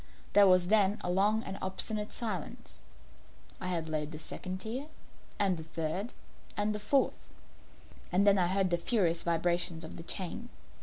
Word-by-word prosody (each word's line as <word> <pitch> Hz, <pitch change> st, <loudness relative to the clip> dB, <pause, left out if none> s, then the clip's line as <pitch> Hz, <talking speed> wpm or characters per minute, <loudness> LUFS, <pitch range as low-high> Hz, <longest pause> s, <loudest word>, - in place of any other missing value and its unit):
There 205 Hz, -1 st, +8 dB
was 180 Hz, -1 st, +4 dB
then 205 Hz, -1 st, +4 dB
a 175 Hz, -, -1 dB
long 210 Hz, +4 st, +3 dB
and 195 Hz, +1 st, -6 dB
obstinate 210 Hz, +3 st, -1 dB
silence. 210 Hz, -9 st, -5 dB, 0.8 s
I 180 Hz, -2 st, -1 dB
laid 155 Hz, -1 st, -3 dB
the 155 Hz, -, -6 dB
second 185 Hz, +4 st, -6 dB
tier, 250 Hz, +8 st, -4 dB, 0.5 s
and 195 Hz, -3 st, +2 dB
the 160 Hz, -, -6 dB
third, 165 Hz, +7 st, -3 dB, 0.4 s
and 210 Hz, +1 st, +1 dB
the 210 Hz, -, -3 dB
fourth; 265 Hz, +6 st, +1 dB, 0.8 s
and 190 Hz, +3 st, +3 dB
then 200 Hz, -1 st, +6 dB
I 175 Hz, -, +3 dB
heard 190 Hz, 0 st, +1 dB
the 175 Hz, -, +2 dB
furious 170 Hz, -5 st, +2 dB
vibrations 170 Hz, 0 st, 0 dB
of -, -, -8 dB
the 165 Hz, -, -7 dB
chain. 190 Hz, +7 st, -3 dB
190 Hz, 160 wpm, -32 LUFS, 170-210 Hz, 0.8 s, There